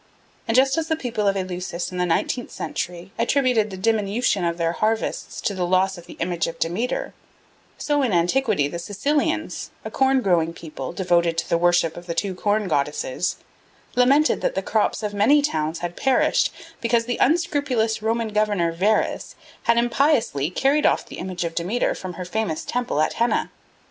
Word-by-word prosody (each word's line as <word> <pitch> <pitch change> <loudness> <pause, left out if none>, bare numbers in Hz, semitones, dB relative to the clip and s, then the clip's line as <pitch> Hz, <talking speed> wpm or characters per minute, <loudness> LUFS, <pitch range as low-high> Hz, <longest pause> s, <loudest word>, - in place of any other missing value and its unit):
And 225 +2 +2
just 270 +3 +4
as 320 - -3
the 320 - +1
people 235 -8 -2
of 195 0 +2
Eleusis 180 -1 -4
in 180 - -5
the 180 - +1
nineteenth 235 +8 -1
century 175 +1 -5
attributed 240 -3 +2
the 190 - -7
diminution 210 0 +1
of 170 0 0
their 165 -1 +1
harvests 220 +5 -2
to 205 - -1
the 185 -2 -2
loss 185 +2 +2
of 175 -1 -12
the - - -10
image 170 -1 -1
of 165 - -6
Demeter, 235 - -2 0.6
so 290 -1 0
in 255 -5 +1
antiquity 180 - +2
the 170 +4 -5
Sicilians, 295 - -1 0.2
a - - -5
corn 265 -1 +2
growing 165 -3 +2
people 150 -6 -7
devoted 170 -2 +1
to - - -1
the 170 - +2
worship 175 -2 +2
of 175 +1 -10
the 170 - -3
two 195 +2 -1
Corn 205 +2 0
Goddesses, 150 +1 -1 0.6
lamented 275 +5 +4
that - - -1
the - - -1
crops 220 0 0
of 210 -1 -2
many 215 +9 +4
towns 160 - -1
had 175 0 -5
perished 265 -1 +2 0.3
because 230 0 +2
the 245 0 -2
unscrupulous 285 -9 +1
Roman 225 +1 0
governor 205 -5 +1
Verres 200 +6 0 0.3
had 235 - +5
impiously 235 - +2
carried 275 +10 +2
off - - +1
the - - -9
image 185 -1 -4
of 165 -1 -3
Demeter 180 +9 0
from 185 -1 -7
her 180 +1 -6
famous 195 -4 -2
temple 245 -11 -1
at 155 - +1
Henna. 235 - +1
205 Hz, 180 wpm, -23 LUFS, 175-245 Hz, 0.6 s, had